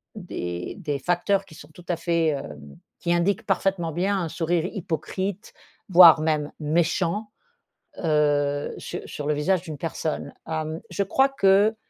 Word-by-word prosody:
des 90 - -5
des 145 -2 -3
facteurs 185 +5 +1
qui 180 - -16
sont 145 0 -13
tout 175 +1 -15
à 175 - 0
fait, 170 -1 +1
hem, 75 - -6 0.2
qui 170 - 0
indiquent 175 +3 +1
parfaitement 190 -3 0
bien 190 +5 0
un 165 - -3
sourire 165 +1 0
hypocrite 190 +1 -4 0.4
voire 170 -3 +9
même 155 -2 0
méchant, 170 +6 0 0.8
heu, 145 -2 +1
su - - -6
sur 145 - -6
le 150 - +2
visage 180 +4 +1
d'une 155 -5 -7
personne. 160 0 -3 0.2
Hem, 155 0 -3
je 200 - -1
crois 265 +8 +3
que 205 -4 +4
170 Hz, 150 wpm, -25 LUFS, 150-190 Hz, 0.8 s, voire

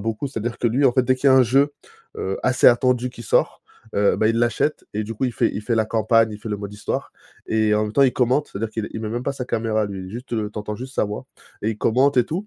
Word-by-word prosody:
beaucoup 115 +6 -3
c'est 130 - -5
à - - -5
dire 120 +1 -3
que - - 0
lui 130 +5 +1
en 125 - +5
fait 130 - +3
dès 130 +1 +2
qu'il 140 +2 +2
y - - +6
a 130 - +6
un 130 - +7
jeu, 135 +5 +3 0.5
heu, 95 +1 -2
assez 130 0 +3
attendu 125 0 +2
qui 120 - -11
sort, - - +1 0.3
heu, 100 0 +3
bah, 110 - +2
il 115 +1 +1
l'achète 120 +5 0
et 105 - -2
du 110 +2 -6
coup 120 - -2
il 125 - -1
fait - - +1
il 105 - -5
fait 115 +1 0
la 110 -1 +1
campagne, 115 0 +2
il 105 - -7
fait 110 - -8
le 105 - -1
mode 100 0 -7
histoire. 105 - -4 0.4
Et 110 -1 +2
en 105 - +2
même 105 - -5
temps 140 - +4
il 130 -2 +4
commente, 130 +3 +1
c'est - - -5
à - - -7
dire 115 - -2
qu'il 110 -1 -3
il 110 - -5
met 110 - -4
même 120 +3 -3
pas 140 - -1
sa 130 -2 -5
caméra 110 -3 0
lui, 95 -2 -7
juste, 120 +4 -8
heu, 105 -2 -2
tu - - -6
entends 105 0 -5
juste 130 +3 -8
sa - - +1
voix, 105 0 -6 0.4
et 110 - +1
il 110 - -6
commente 130 +6 +2
et 120 - +5
tout. 180 - -4
115 Hz, 320 wpm, -22 LUFS, 105-130 Hz, 0.5 s, un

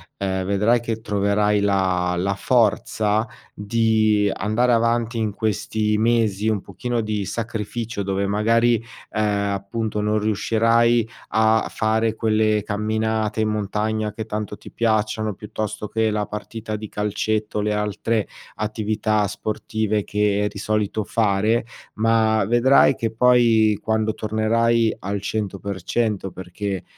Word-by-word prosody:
ehm, 95 -1 -2
vedrai 105 +5 +2
che 115 -1 -4
troverai 105 0 +1
la 95 -3 +1
la 95 +3 0
forza 110 -1 +1 0.3
di 110 -1 +2
andare 110 +6 +1
avanti 115 0 +1
in 110 -2 -1
questi 105 0 -1
mesi 110 -2 +1
un 110 -3 +1
pochino 120 +6 -3
di 105 -2 -2
sacrificio 115 0 -4
dove 100 0 -1
magari, 115 +3 +2 0.3
ehm, 100 -1 0
appunto 105 +2 -3
non 105 +1 +1
riuscirai 115 +2 +2 0.2
a 110 0 +3
fare 110 0 0
quelle 110 -1 +1
camminate 110 +1 -1
in 110 - +1
montagna 105 +1 -1
che 110 0 -5
tanto 105 -1 -4
ti - - -13
piacciono, 110 -1 0
piuttosto 105 +1 -5
che 110 0 +1
la 105 -1 -1
partita 110 +1 -6
di 110 0 -7
calcetto, 105 +1 -2
le 105 0 0
altre 105 +1 -1 0.3
attività 110 -1 0
sportive 110 +1 -2
che 105 0 +1
di - - -11
solito 105 +1 -1
fare, 110 +2 +1 0.3
ma 110 -1 +2
vedrai 120 +6 +5
che 115 -1 -2
poi, 115 -3 +4
quando 110 0 0
tornerai 115 +1 +1
al 100 +2 -3
100%, 100 0 -2
perché 95 +1 -5
110 Hz, 125 wpm, -22 LUFS, 105-110 Hz, 0.3 s, vedrai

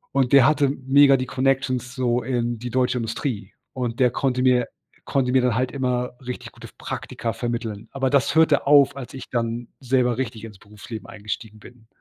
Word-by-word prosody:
Und 135 -2 +2
der 135 -3 +8
hatte 145 -1 +3
mega 135 +1 +4
die 130 -1 -1
Connections 130 -1 -1
so 125 -2 +1
in 120 -1 -2
die 125 +2 -5
deutsche 125 0 +1
Industrie 115 -3 -4 0.2
und 120 -3 -4
der 125 -2 +4
konnte 125 0 0
mir 125 -1 +3 0.4
konnte 130 -2 0
mir 130 0 +4
dann 125 -3 +1
halt 125 +1 0
immer 125 -2 -1 0.2
richtig 125 - -6
gute - - -12
f - - -21
Praktika 115 -1 -5
vermitteln. 115 -3 -4
Aber 135 -1 -1
das 140 -1 +2
hörte 160 -4 +4
auf, 140 -2 +6
als 135 -3 -8
ich 130 - -9
dann 115 0 -2
selber 125 -2 +1
richtig 115 -4 -4
ins 105 -4 -10
Berufsleben 105 +2 -10
eingestiegen 105 +1 -7
bin. 115 +1 -16
125 Hz, 190 wpm, -23 LUFS, 115-135 Hz, 0.4 s, der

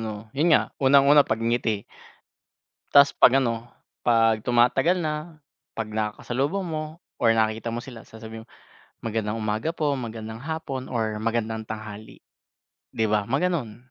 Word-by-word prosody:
ano, 110 0 -6
'yun 160 +4 +2
nga, - - -2
unang-una 140 +2 +6
pagngiti. 115 -3 -1 1.1
Tas 140 0 +8
'pag 135 +2 +6
ano, 115 -1 -3 0.3
'pag 115 -2 +3
tumatagal 130 +9 +3
na, 155 0 -4 0.3
pag 110 -1 -4
nakakasalubong 120 - -2
mo 155 +1 -5 0.2
or 115 -2 +3
nakita 110 +1 0
mo 120 - -3
sila 120 -3 -11
sasabihin 110 0 -10
mo, - - -35 0.5
"Magandang 110 -1 -2
umaga 110 +7 -2
po, 150 -4 0
magandang 110 -2 -6
hapon 145 -1 -5
or 110 -4 -2
magandang 110 0 -2
tanghali," 110 0 -9 0.7
'di 110 - +1
ba? 105 -1 +1
Mga 135 +7 0
ganon. 130 -9 -3
115 Hz, 140 wpm, -25 LUFS, 110-140 Hz, 1.1 s, Tas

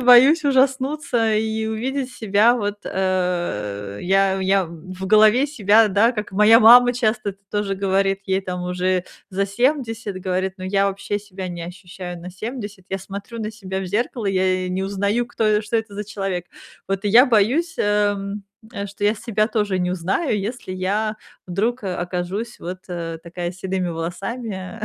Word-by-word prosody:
боюсь 255 +6 +7
ужаснуться 265 -3 +2
и 220 0 -1
увидеть 255 +4 -2
себя 220 +3 +3
вот, 205 -2 -3
э 175 - -2
Я 195 +1 +2
я 190 0 +2
в 185 +3 -8
голове 215 +6 +5
себя, 220 -5 +4
да, 205 +4 +4
как 210 -2 -5
моя 210 +3 +7
мама 245 +2 +8
часто 220 -3 0
это 195 - -15
тоже 205 -1 -1
говорит- 195 0 +1
ей 190 0 +1
там 180 -1 -5
уже 180 0 0 0.3
за 195 +1 0
70- 225 -2 -1
говорит: 185 0 -1
"Но 185 - -8
я 195 +1 +2
вообще 200 +1 -3
себя 190 -2 -7
не 175 -1 -6
ощущаю 180 0 -8
на 180 +2 -8
70. 205 -1 -7
Я 195 - -2
смотрю 200 +4 -8
на 215 0 -4
себя 190 -3 -5
в 190 - -4
зеркало, 220 +3 -2
я 185 -1 +1
и - - -4
не 185 +1 -1
узнаю, 200 +4 0
кто 215 -3 +1
что 210 +2 -1
это 220 -2 -3
за 210 - -3
человек". 195 -3 -4 0.4
Вот 195 +1 -2
и 205 - +2
я 245 +6 +7
боюсь, 255 - +2
эм, 205 -1 0 0.3
э, 200 -4 -4
что 200 +1 -6
я 210 +1 +3
себя 215 -1 0
тоже 210 -5 0
не 180 0 0
узнаю, 190 - 0
если 210 +1 -5
я 205 +4 -1 0.3
вдруг, 220 +8 -1
э, 185 - -2
окажусь 180 +7 -4
вот, 180 +2 -5
э, 170 -2 -4
такая 175 +1 -5
с - - -16
седыми 185 -1 -2
волосами 190 +5 -5
200 Hz, 175 wpm, -21 LUFS, 185-225 Hz, 0.4 s, мама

